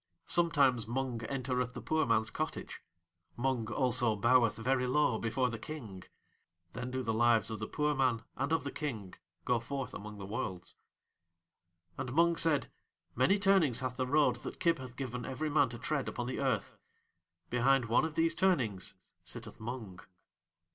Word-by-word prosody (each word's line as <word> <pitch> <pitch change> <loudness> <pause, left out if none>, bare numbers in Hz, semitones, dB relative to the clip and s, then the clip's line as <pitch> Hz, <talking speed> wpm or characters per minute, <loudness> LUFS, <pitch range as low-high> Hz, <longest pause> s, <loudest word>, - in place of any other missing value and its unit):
Sometimes 140 -9 +3
Mung 120 -1 -2
entereth 125 -1 -2
the - - -4
poor 155 -2 +1
man's 110 0 +2
cottage; 155 +1 -4 0.6
Mung 120 -3 -1
also 120 -1 +2
boweth 120 +2 +4
very 125 +2 +1
low 125 -3 +2
before 125 +2 0
The 115 - -5
King. 110 -11 -8 0.7
Then 125 +1 -4
do 130 0 -3
the 115 -1 0
Lives 115 -1 +3
of 110 - -4
the 110 - -4
poor 150 0 0
man 130 -4 +1
and 140 +3 -2
of 160 -4 +2
The 140 - -4
King 110 - -5 0.3
go 120 -1 +2
forth 135 +3 -4
among 105 0 -7
the 100 - -7
Worlds. 95 -4 -5 1.2
And 120 - -3
Mung 170 +1 +4
said: 160 -3 +1 0.4
"Many 130 - +3
turnings 190 - +3
hath 125 -1 -3
the 130 -1 0
road 140 -3 +3
that - - -8
Kib 170 -2 +2
hath 125 -2 -9
given 125 -2 -4
every 150 +4 -3
man 145 -4 +4
to 120 - -6
tread 145 +1 -1
upon 120 - -4
the 125 - -3
earth. 130 -7 -1 0.7
Behind 125 +1 +3
one 115 +5 +3
of 160 -1 -3
these 165 0 +2
turnings 115 - +1 0.3
sitteth - - -8
Mung." 110 -5 -6
125 Hz, 170 wpm, -33 LUFS, 115-145 Hz, 1.2 s, boweth